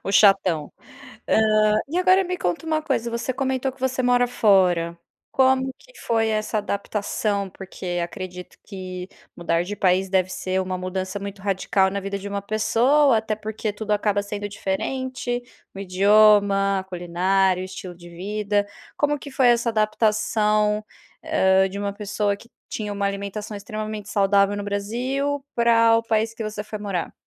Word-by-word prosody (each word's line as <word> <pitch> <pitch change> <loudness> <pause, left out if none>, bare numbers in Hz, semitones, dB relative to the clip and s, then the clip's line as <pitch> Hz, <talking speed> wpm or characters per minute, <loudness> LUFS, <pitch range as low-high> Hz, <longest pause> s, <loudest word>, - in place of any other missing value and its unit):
O 195 - -2
chatão. 185 -8 +4 0.6
Hã, 215 -1 +3
e 330 - -3
agora 370 +1 +4
me 365 0 -3
conta 175 - -2
uma 315 -1 0
coisa, 260 -6 -1
você 235 +2 -2
comentou 265 0 -1
que 265 - -22
você 260 0 0
mora 245 0 +3
fora, 180 -7 +3 0.3
como 265 0 +3
que - - -19
foi 225 -1 +1
essa 215 0 0
adaptação, 200 0 -2
porque 185 -1 -5
acredito 180 0 -8
que 185 -2 -7 0.3
mudar 170 0 0
de 205 +4 -5
país 190 -1 +2
deve 185 -1 +2
ser 185 0 -2
uma 185 0 -3
mudança 185 +1 -4
muito 200 0 -7
radical 190 0 +1
na 200 +1 -3
vida 200 0 -4
de 200 - -7
uma 200 0 -3
pessoa, 230 +6 +3
até 220 0 -2
porque 215 0 -4
tudo 215 +1 -5
acaba 205 -1 +1
sendo 205 0 -5
diferente, 245 +5 -3 0.3
o - - -7
idioma, 200 0 +4
a - - -5
culinária, 185 +1 +1
o - - -4
estilo 185 -1 -8
de 175 0 -13
vida, 205 +3 -1 0.3
como 295 0 +1
que 280 - -9
foi 265 -1 +3
essa 235 0 +3
adaptação, 215 -1 +1 0.4
hã, 190 0 +3
de 200 +1 -6
uma 200 0 -2
pessoa 205 0 -1
que 235 - -17 0.2
tinha 210 -2 -4
uma 200 0 -2
alimentação 200 +2 -4
extremamente 215 0 -6
saudável 200 0 +3
no 205 - -4
Brasil 250 +8 -2
pra 230 -1 +5
o - - +1
país 225 0 0
que 230 -1 -6
você 215 -1 -4
foi 215 0 -7
morar? 195 -4 -3
205 Hz, 165 wpm, -23 LUFS, 190-230 Hz, 0.6 s, pra